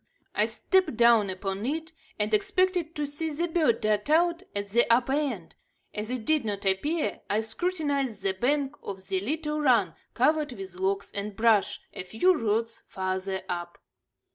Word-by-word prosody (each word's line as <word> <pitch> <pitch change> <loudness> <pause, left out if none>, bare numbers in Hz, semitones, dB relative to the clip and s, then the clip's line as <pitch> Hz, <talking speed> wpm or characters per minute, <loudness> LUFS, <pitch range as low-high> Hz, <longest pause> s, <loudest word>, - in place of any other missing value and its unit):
I - - +2
stepped 375 - +1
down 235 -4 +5
upon 195 +1 -4
it 320 +2 -3 0.2
and 210 +1 -1
expected 355 - +1
to 295 - -1
see 290 +3 -4
the 325 +3 -1
bird 320 -8 +2
dart 210 +3 0
out 340 +2 +3
at 200 0 -3
the 235 +3 +3
upper 245 +3 +3
end. 265 - -2 0.4
As 210 +1 -4
it 250 -3 -3
did 310 -3 +3
not 205 -2 -4
appear, 210 - 0
I 210 +2 +2
scrutinized 280 - -1
the 195 - +2
bank 275 +6 0
of 190 -1 -7
the 190 -1 +1
little 300 +7 -2
run, 230 - +3 0.2
covered 295 +2 +2
with 190 -4 -8
logs 195 +1 -1
and 200 0 -4
brush, 220 -2 +3
a - - -5
few 225 - +3
rods 230 -1 -1
farther 190 0 -3
up. 175 -1 -4
230 Hz, 165 wpm, -27 LUFS, 200-300 Hz, 0.4 s, down